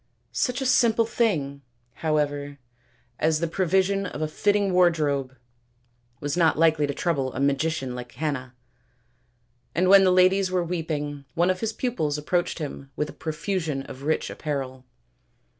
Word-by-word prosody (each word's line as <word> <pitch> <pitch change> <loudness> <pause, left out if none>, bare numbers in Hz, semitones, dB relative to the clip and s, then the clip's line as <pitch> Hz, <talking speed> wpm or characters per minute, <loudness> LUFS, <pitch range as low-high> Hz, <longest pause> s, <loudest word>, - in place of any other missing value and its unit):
Such 255 +1 -1
a - - -1
simple 235 -3 +4
thing, 155 - 0 0.4
however, 145 -2 -1 0.6
as 155 0 +2
the 170 - 0
provision 190 +3 +1
of 150 - -7
a - - 0
fitting 200 +4 +1
wardrobe 150 -7 +2 0.8
was 145 0 -2
not 165 -4 +3
likely 160 -2 +3
to 140 - -2
trouble 140 -7 0
a - - -3
magician 140 -1 0
like 125 0 -7
Canna, 130 -1 -4 1.2
and 180 +3 +2
when 195 0 +8
the 190 - +5
ladies 185 +1 +4
were 185 -1 +1
weeping 150 -4 -3
one 175 +2 +3
of 185 - -3
his 225 -1 -1
pupils 210 - -1
approached 175 +4 -1
them 145 -3 -6
with 150 0 -2
a - - -9
profusion 160 -2 -3
of 135 0 -10
rich 155 +3 -1
apparel. 130 -3 -4
160 Hz, 150 wpm, -25 LUFS, 145-185 Hz, 1.2 s, when